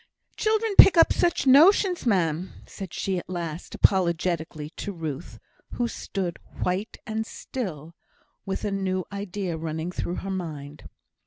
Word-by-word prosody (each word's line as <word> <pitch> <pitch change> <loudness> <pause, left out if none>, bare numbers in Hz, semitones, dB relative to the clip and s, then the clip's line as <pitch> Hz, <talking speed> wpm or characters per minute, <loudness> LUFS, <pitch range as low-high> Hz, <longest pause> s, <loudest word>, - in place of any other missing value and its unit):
"Children 435 0 +1
pick 380 - +10
up 330 - +6
such 345 -4 +1
notions, 345 - +5
ma'am," 175 -4 +1
said 195 -3 -8
she 190 -2 -2
at - - -12
last, 170 -2 -5
apologetically, 170 -4 +1
to 205 - -5
Ruth, 150 - -6 0.4
who 240 - 0
stood, 190 -6 -4 0.2
white 185 +5 -2
and 220 0 -2
still, 170 - -6 0.5
with 195 +1 -4
a 205 - -1
new 185 -2 -1
idea 200 -3 -4
running 160 +2 -4
through 180 0 -3
her 195 - -3
mind. 150 -6 -6
185 Hz, 140 wpm, -26 LUFS, 165-215 Hz, 0.5 s, pick